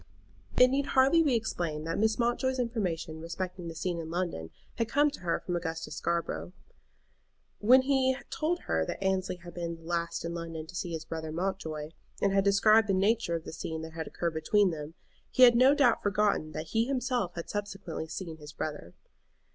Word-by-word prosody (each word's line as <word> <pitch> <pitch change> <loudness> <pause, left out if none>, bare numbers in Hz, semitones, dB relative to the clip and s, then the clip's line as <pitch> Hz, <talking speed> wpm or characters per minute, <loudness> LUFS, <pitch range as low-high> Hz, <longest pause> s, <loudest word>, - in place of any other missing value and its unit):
It 250 - +8
need 275 +2 0
hardly 270 +5 +5
be 285 -6 +3
explained 170 -9 -2
that 165 +3 -2
Mrs. 220 0 +2
Mountjoy's 250 +2 +1
information 185 -10 -2
respecting 180 +1 -5
the 165 - -6
scene 175 0 -2
in 160 -1 -6
London 170 - -3 0.3
had 230 -1 0
come 290 +4 +3
to - - -9
her 170 -2 -1
from 180 - -3
Augustus 165 -1 -4
Scarborough. 170 +1 -2 1.1
When 255 +5 +6
he 260 -1 +2
told 335 +3 -1
her 80 - 0
that 140 - -4
Annesley 190 -1 0
had 175 -1 -12
been 170 -1 -4
the 165 - -17
last 170 0 -2
in 170 - -3
London 165 -2 -5
to 160 - -12
see 175 -2 -3
his 160 -1 -4
brother 160 -1 -5
Mountjoy, 160 -4 -3 0.3
and 200 -1 +2
had 195 0 +4
described 210 +2 +5
the 195 - +2
nature 200 -2 +2
of 165 - -4
the - - -8
scene 160 0 -5
that 160 0 -8
had 160 -1 -5
occurred 170 -2 -2
between 195 +4 +3
them, 155 0 -7 0.3
he 255 - +4
had 240 -1 +9
no 260 +4 +6
doubt 285 -4 +4
forgotten 205 -6 +1
that 155 - -5
he 225 +1 +2
himself 250 -7 -1
had 170 - -5
subsequently 195 -6 -4
seen 165 -1 -6
his 150 -1 -11
brother. 150 - -5
180 Hz, 195 wpm, -30 LUFS, 165-230 Hz, 1.1 s, had